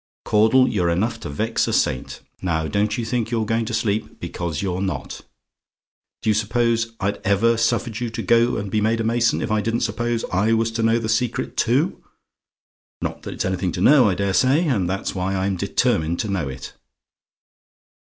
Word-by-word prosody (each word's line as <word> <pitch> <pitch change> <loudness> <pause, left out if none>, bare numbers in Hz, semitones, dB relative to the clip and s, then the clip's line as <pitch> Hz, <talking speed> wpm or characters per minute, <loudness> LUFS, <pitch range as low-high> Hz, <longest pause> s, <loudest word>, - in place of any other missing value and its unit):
"Caudle, 110 +5 +4
you're 95 -7 0
enough 95 +8 0
to - - -7
vex 110 +10 -1
a - - -1
saint! 65 - -1 0.2
Now 80 -3 -1
don't 105 +4 0
you 120 - -2
think 115 -1 -1
you're 115 -2 0
going 115 +1 0
to 115 - -5
sleep; 105 -1 -2
because 85 -1 -4
you're 95 -1 -2
not. 95 -1 -4 1.0
Do 110 - +3
you - - +3
suppose 115 +2 0
I'd 100 +1 -1
ever 105 +4 +3
suffered 115 0 0
you 120 -1 -2
to 110 - -5
go 115 +1 +3
and 100 -2 -4
be 105 - +1
made 110 +2 +1
a - - 0
mason, 115 +1 +1
if - - -3
I 110 0 +2
didn't 115 +3 -1
suppose 115 +1 -1
I 105 +5 +2
was 115 0 +1
to 115 0 -2
know 115 +1 +3
the 115 -2 -3
secret 115 +2 -1
too? - - +1 1.0
Not - - -4
that - - -7
it's - - -2
anything 95 -1 -1
to 90 - -3
know, 130 0 +6
I 95 - 0
dare 100 0 -1
say; 135 - +3
and 100 - 0
that's 95 +1 -2
why 95 +1 -2
I'm 95 +1 0
determined 85 -1 0
to 105 - -4
know 90 -8 -1
it. 65 0 -8
110 Hz, 200 wpm, -22 LUFS, 95-115 Hz, 1.0 s, know